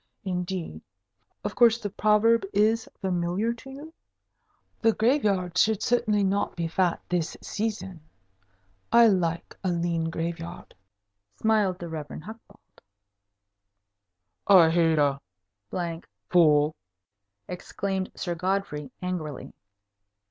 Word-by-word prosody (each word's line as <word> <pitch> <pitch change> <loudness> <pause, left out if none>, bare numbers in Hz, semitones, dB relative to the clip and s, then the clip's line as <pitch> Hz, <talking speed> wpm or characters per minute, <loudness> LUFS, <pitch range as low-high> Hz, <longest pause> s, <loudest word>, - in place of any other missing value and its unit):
Indeed, 180 - -4 0.6
of 205 - -3
course 235 -2 +5
the 205 -4 -5
proverb 215 +2 +3
is 220 +3 +2
familiar 185 +4 0
to 235 +3 -13
you? 290 +4 -10 0.9
the 225 -1 +4
graveyards 205 - +2
should 215 -2 +2
certainly 215 -4 +2
not 195 +1 0
be 170 -1 -2
fat 175 +1 +1
this 175 -3 -2
season. 205 -5 -4 0.9
I 235 0 +7
like 170 -4 -1
a 190 - 0
lean 170 -1 -1
graveyard," 165 +1 -5 0.6
smiled 210 -4 +1
the 175 - -7
Rev. 155 -3 -6 0.2
Hucbald. 215 0 -14 1.7
"I 175 -5 +7
hate 165 -1 +3
a 140 -2 +2 1.1
fool!" 150 -3 +4 0.7
exclaimed 190 +1 -4
Sir 175 - -3
Godfrey, 170 -6 -2
angrily. 170 -6 -4
185 Hz, 105 wpm, -26 LUFS, 170-215 Hz, 1.7 s, I